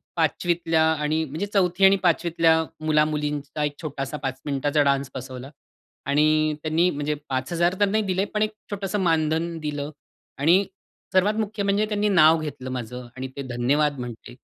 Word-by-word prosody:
5वीतल्या 165 0 +1
आणि 155 +1 0
म्हणजे 155 +7 -4
4थी 190 -1 +3
आणि 195 - +7
5वीतल्या 165 -1 +3 0.3
मुलामुलींचा 150 -1 0
एक 145 -1 -1
छोटासा 150 -1 -4
5 130 0 -3
मिनिटाचा 145 +1 +1
डान्स 140 -1 +1
बसवला 130 +1 -7 0.6
आणि 155 +2 +3
त्यांनी 165 +3 +2
म्हणजे 150 -1 -2
5000 170 +7 0
तर 205 - +5
नाही 215 +2 +1
दिले, 190 0 0
पण 210 +1 -3
एक 215 - +1 0.2
छोटंसं 200 0 -2
मानधन 165 -1 +1
दिलं 150 -2 -4 0.5
आणि 170 +7 +4 0.5
सर्वात 190 +3 +4
मुख्य 215 -1 -2
म्हणजे 200 +2 +2
त्यांनी 210 0 0
नाव 165 -4 +6
घेतलं 140 -4 -6
माझं 125 0 -6
आणि 130 - -4
ते - - -3
धन्यवाद 135 +4 +1
म्हंटले. 120 0 -8
155 Hz, 155 wpm, -24 LUFS, 140-180 Hz, 0.6 s, आणि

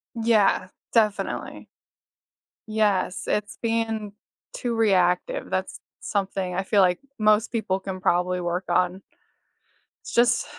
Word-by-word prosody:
Yeah, 215 -5 +2 0.2
definitely. 215 -3 0 1.0
Yes, 210 -4 +1
it's 210 0 -2
being 225 -2 -1 0.4
too 245 - -2
reactive. 200 - +1
That's - - -3 0.2
something 190 -2 -2
I 190 - 0
feel 200 +1 +2
like 180 -1 +3 0.2
most 215 +1 +3
people 195 -4 -1
can 185 -1 -6
probably 180 0 +1
work 175 +1 -2
on. 180 +2 +1 1.1
It's - - -7
just 240 +1 +3
200 Hz, 115 wpm, -25 LUFS, 185-220 Hz, 1.1 s, like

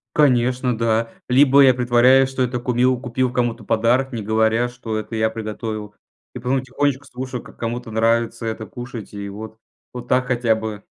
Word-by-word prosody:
Конечно, 125 -4 +2
да, 115 0 +1 0.2
либо 140 +2 +6
я 130 -2 +7
притворяюсь, 125 +2 +4
что 135 -1 -3
это 125 0 -2
кумил, 125 +1 +1
купил 125 0 -1
кому-то 120 -2 -1
подарок, 120 +5 +1
не 115 -3 -4
говоря 110 +3 +1
что 120 -3 -5
это 110 +1 -5
я 110 0 +1
приготовил, 110 -1 -6 0.4
и - - -5
потом 130 +2 0
тихонечко 135 +1 -1
слушаю, 130 -2 -6
как - - -16
кому-то 120 0 -4
нравится 115 +1 0
это 110 -1 -4
кушать, 120 -4 -9
и 100 0 -6
вот 110 +2 -9 0.4
вот 120 -1 -8
так 125 0 +2
хотя 120 -3 +2
бы. 110 -2 -6
120 Hz, 175 wpm, -21 LUFS, 110-125 Hz, 0.4 s, я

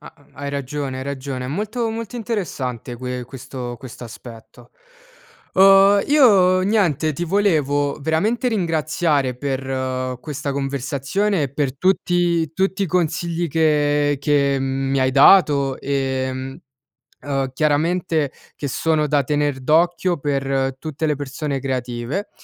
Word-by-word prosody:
Ha - - -12 0.2
hai 140 0 -5
ragione, 140 -1 -4
hai - - -4
ragione, 135 -2 -5
è 125 - -5
molto 215 - -2
molto 225 0 -6
interessante, 135 - -4
que 125 0 -5
questo 125 -1 -7 0.3
aspetto. 115 -1 -12 0.8
Uhm, 195 +1 +6
io 200 -11 +5
niente, 180 - +1
ti 175 +5 -3
volevo 150 -7 +1
veramente 205 - 0
ringraziare 155 - 0
per 130 -1 -3
questa 145 -2 -4
conversazione, 140 +7 -1
e 135 -2 -3
per 140 -2 -2
tutti 175 -3 +1
tutti 190 +3 0
i 195 - +1
consigli 170 0 -1
che 145 -2 +2
che 140 -1 +2
mi 135 0 -1
hai 130 0 +2
dato, 140 -3 +5
ehm, 130 0 -2 0.6
uhm, 135 -2 -2
chiaramente 155 +1 +1 0.2
che 145 - -4
sono 155 +3 0
da 145 -1 +2
tener 145 0 0
d'occhio 170 +4 +2
per 135 -2 -1
tutte 155 +1 -4
le 150 -1 +1
persone 140 0 -4
creative, 130 - -3
145 Hz, 125 wpm, -21 LUFS, 135-175 Hz, 0.8 s, Uhm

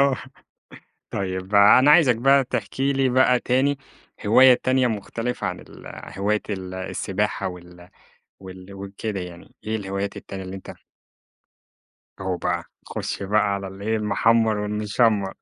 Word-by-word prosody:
آه، 140 -1 +3 0.9
طيب 95 +1 -4
أنا 105 +7 +7
عايزك 150 -6 +6
بقى 135 +3 +4
تحكي 135 +2 -2
لي 135 -1 +1
بقى 125 -1 +3
تاني 135 +3 +1 0.5
هواية 130 +4 +7
تانية 130 0 +2
مختلفة 115 +2 -3
عن - - -4
ال - - -15 0.3
هواية 105 +2 0
ال 95 -2 -5
السباحة 95 0 -2
وال 90 0 -12 0.5
وال 95 +1 -11
وكده 100 +1 -5
يعني، 85 -1 -10
إيه 110 +1 -1
الهوايات 100 0 -4
التانية 95 -1 -7
اللي 95 +1 -7
أنت 95 - -10 1.5
أوه 95 -2 -2
بقى، - - -2 0.2
خُش - - -5
بقى 105 +2 +2
على 100 -1 -4
اللي 95 +1 -10
إيه، 110 +1 +1
المحمر 110 +1 +2
والمشمر. 105 0 0
105 Hz, 135 wpm, -23 LUFS, 95-125 Hz, 1.5 s, أنا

